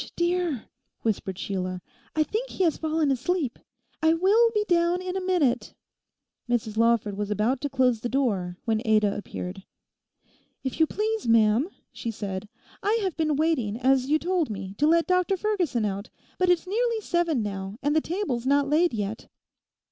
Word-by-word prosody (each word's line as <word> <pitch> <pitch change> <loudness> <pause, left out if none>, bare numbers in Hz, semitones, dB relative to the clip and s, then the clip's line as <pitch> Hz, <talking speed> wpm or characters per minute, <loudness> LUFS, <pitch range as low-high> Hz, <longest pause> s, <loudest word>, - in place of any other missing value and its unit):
'Ssh, - - -7
dear!' 345 -7 0 0.4
whispered 195 -4 -1
Sheila, 185 -2 -3 0.4
'I 310 - +4
think 440 +11 -3
he 380 - -1
has 330 -3 +3
fallen 315 -2 +1
asleep. 275 0 -1 0.4
I 320 +1 +4
will 415 +7 +4
be 425 -2 0
down 345 0 +2
in 370 0 -4
a 380 - -1
minute.' 315 -10 +1 0.7
Mrs 225 -3 0
Lawford 230 -3 +2
was 205 0 -3
about 215 +5 0
to 285 - -2
close 255 -4 +2
the 240 - -3
door 200 -10 0
when 220 -1 +1
Ada 215 -3 +3
appeared. 195 -2 -6 1.0
'If 265 +2 -4
you 320 - +5
please, 435 - -2
ma'am,' 225 - +4 0.2
she 230 - -5
said, 200 -2 -5 0.3
'I 425 +3 +2
have 375 -4 -1
been 310 -2 +1
waiting, 275 -9 +1
as 260 +1 +2
you 305 - +4
told 350 -2 0
me, 195 -2 -5
to 295 - +4
let 335 +1 +4
Dr 365 +1 +2
Ferguson 355 - 0
out, 200 +1 -3 0.3
but 365 -1 +3
it's 355 0 +3
nearly 460 +4 0
seven 340 - 0
now; 195 0 -5
and 290 +1 +1
the 315 - +4
table's 310 - -2
not 280 0 +3
laid 310 0 +3
yet. 210 +1 -4
280 Hz, 175 wpm, -26 LUFS, 220-350 Hz, 1.0 s, you